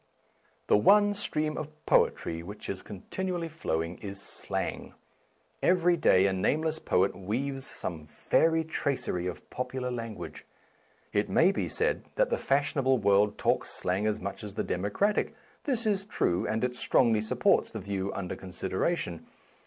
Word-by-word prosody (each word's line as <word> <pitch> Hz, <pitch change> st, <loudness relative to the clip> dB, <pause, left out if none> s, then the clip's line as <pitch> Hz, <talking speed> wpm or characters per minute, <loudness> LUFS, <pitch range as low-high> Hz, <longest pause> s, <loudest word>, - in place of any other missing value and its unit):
The -, -, +5 dB
one 205 Hz, -, +5 dB
stream 155 Hz, -6 st, -1 dB
of 155 Hz, -, -5 dB, 0.2 s
poetry 80 Hz, 0 st, +2 dB
which 100 Hz, +5 st, -8 dB
is 95 Hz, -, -6 dB
con 100 Hz, -3 st, -10 dB
tinually 180 Hz, -3 st, -2 dB
flowing 85 Hz, -, -3 dB
is 100 Hz, -1 st, -6 dB
slang. -, -, -4 dB, 0.7 s
Every 180 Hz, -1 st, +4 dB
day 95 Hz, -, +4 dB
a 95 Hz, -, +2 dB
nameless 155 Hz, +11 st, 0 dB
poet 95 Hz, +2 st, +2 dB
weaves 130 Hz, +8 st, -3 dB
some 80 Hz, -3 st, -5 dB
fairy 160 Hz, -, +2 dB
tracery 140 Hz, -, -2 dB
of 90 Hz, -, -6 dB
popular 125 Hz, 0 st, -3 dB
language. 115 Hz, -3 st, -6 dB, 0.7 s
It 105 Hz, 0 st, +1 dB
may 175 Hz, +4 st, +5 dB
be -, -, -2 dB
said 460 Hz, +2 st, 0 dB
that -, -, +2 dB
the -, -, +2 dB
fashionable 135 Hz, -1 st, +2 dB
world 100 Hz, -1 st, +3 dB
talks -, -, +1 dB
slang 95 Hz, +4 st, -1 dB
as 105 Hz, -, 0 dB
much 100 Hz, +2 st, -5 dB
as 105 Hz, -2 st, -6 dB
the -, -, -1 dB
democratic; 105 Hz, -, 0 dB, 0.3 s
this 245 Hz, -5 st, 0 dB
is 200 Hz, -2 st, +1 dB
true, 90 Hz, -, 0 dB
and 110 Hz, +2 st, -1 dB
it 125 Hz, 0 st, 0 dB
strongly 115 Hz, -3 st, +3 dB
supports 110 Hz, -, +2 dB
the -, -, -5 dB
view 100 Hz, 0 st, -3 dB
under 95 Hz, -2 st, -4 dB
consideration. 95 Hz, -, -2 dB
115 Hz, 155 wpm, -29 LUFS, 95-160 Hz, 0.7 s, The